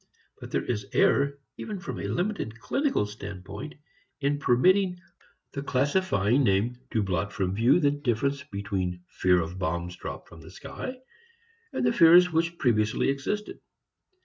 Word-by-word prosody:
But - - -9
there - - -1
is 105 -4 -3
error, 140 0 +3 0.2
even 210 -3 -5
from 195 - -6
a - - -3
limited 175 - -2
clinical 275 - 0
standpoint, 105 +5 -8 0.4
in 145 0 0
permitting 180 +8 +3 0.5
the 140 - -4
classifying 135 - +1
name 115 +3 +1
to 110 -4 0
blot 95 +1 -1
from 95 -1 -1
view 115 - +4
the 145 -4 +3
difference 140 0 -1
between 95 -5 -4
fear 90 -1 +2
of 85 +2 -4
bombs 85 +1 -2
dropped - - -8
from 85 -1 -14
the 80 - -12
sky 255 - -7 0.8
and - - -1
the - - +3
fears 175 +1 +7
which 165 +1 0
previously 110 -1 +1
existed. 140 +10 -3
125 Hz, 145 wpm, -27 LUFS, 100-155 Hz, 0.8 s, fears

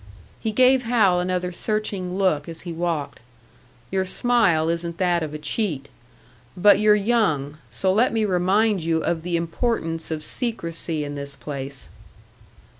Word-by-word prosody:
He 220 - -2
gave 255 +2 +4
Hal 210 -7 +3
another 180 0 -1
searching 195 -2 -2
look 170 -6 +1
as 165 - -7
he 175 -2 -6
walked. 165 -3 -2 0.7
"Your 190 -1 +1
smile 185 -6 +2
isn't 170 0 -2
that 175 -2 +2
of 155 -2 -3
a 150 - -5
cheat. 150 - -2 0.7
But 205 +2 +6
you're 210 0 +5
young 195 -10 +1
so 115 +12 0
let 230 +5 +3
me 225 -1 +1
remind 195 +1 +2
you 160 -1 0
of 170 -2 -1
the 175 0 -1
importance 165 -1 -2
of 155 -1 -3
secrecy 165 - -3
in 145 0 -5
this 140 -1 -6
place." 140 -2 -6
180 Hz, 150 wpm, -23 LUFS, 160-210 Hz, 0.7 s, But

